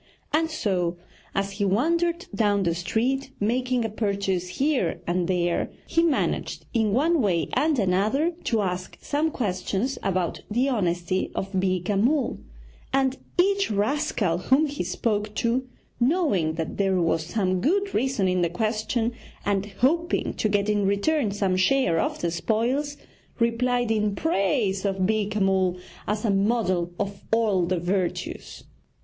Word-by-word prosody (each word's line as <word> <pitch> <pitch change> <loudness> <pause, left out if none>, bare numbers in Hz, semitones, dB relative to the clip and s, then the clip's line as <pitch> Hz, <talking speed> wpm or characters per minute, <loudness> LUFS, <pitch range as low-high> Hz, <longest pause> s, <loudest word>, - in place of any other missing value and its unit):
And 320 +1 +2
so, 180 - -1 0.4
as 195 0 0
he 200 +1 -3
wandered 335 - +1
down 205 -3 +2
the 170 -2 +1
street, 230 +11 -1
making 245 +3 0
a - - +1
purchase 200 -4 -1
here 275 - +1
and 175 0 0
there, 175 -2 0 0.2
he 330 - +2
managed 330 -5 0
in 220 -3 +2
one 305 +7 +3
way 170 - +1
and 305 -1 +2
another 215 - +2
to 225 -3 +1
ask 180 -1 -4
some 300 +2 0
questions 210 +1 -2
about 185 -3 -1
the 245 +6 +1
honesty 180 -5 0
of 195 - -3
Beeka 185 0 0
Mull, 275 +5 +1 0.5
and 265 -1 +2 0.2
each 395 +2 +3
rascal 210 - 0
whom 265 - +3
he 290 -6 -3
spoke 210 +3 -1
to, 250 +2 0 0.3
knowing 240 - +2
that 160 -1 -4
there 195 -2 +2
was 165 -1 +1
some 185 0 0
good 395 - +1
reason 235 -5 +1
in 180 -1 +1
the 170 - +2
question, 220 +4 -1 0.3
and 200 0 0
hoping 335 +7 +1
to 215 - 0
get 205 0 +1
in 210 -1 +1
return 220 +6 +1
some 195 -2 0
share 185 -2 +3
of - - -1
the 170 - 0
spoils, 240 - 0 0.4
replied 240 0 +1
in 210 -2 +1
praise 200 - +1
of 195 -2 0
Beeka 210 0 0
Mull 190 -2 +2 0.3
as 210 +2 -1
a 215 - +3
model 195 -4 +1
of 200 -1 -3
all 210 -6 +2
the 185 0 0
virtues. 180 +1 -3
210 Hz, 150 wpm, -25 LUFS, 185-260 Hz, 0.5 s, one